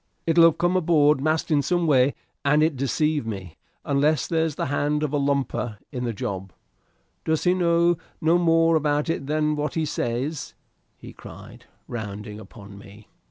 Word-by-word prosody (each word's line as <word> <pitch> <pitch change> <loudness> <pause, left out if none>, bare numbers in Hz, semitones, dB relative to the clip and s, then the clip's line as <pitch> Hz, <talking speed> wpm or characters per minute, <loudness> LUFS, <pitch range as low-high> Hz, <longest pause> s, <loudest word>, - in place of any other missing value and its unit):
"It'll 165 0 +5
have 165 - +4
come 175 +1 +1
aboard 155 -5 +3
masked 155 +2 0
in 145 -2 +3
some 175 +4 0
way, 140 -3 +3 0.3
and 150 +2 +3
it 160 -2 +1
deceived 145 +1 0
me. 95 -6 -7 0.3
Unless 145 +1 +1
there's 160 -2 -1
the - - -2
hand 145 +2 -1
of 150 -1 -2
a 145 - +1
lumper 140 -5 -1
in 125 -1 -4
the 120 - -1
job 95 -2 -5 0.7
does 160 -1 0
he 180 - +3
know 170 -1 +2 0.2
no 165 +2 +3
more 165 -1 +3
about 150 +1 +1
it 140 -4 -4
than 150 0 0
what 150 0 -3
he 160 -1 0
says?" 135 +2 -3 0.4
he - - -12
cried, - - -13 0.2
rounding 105 -2 -6
upon 100 -1 -13
me. 100 +1 -15
150 Hz, 170 wpm, -24 LUFS, 125-160 Hz, 0.7 s, It'll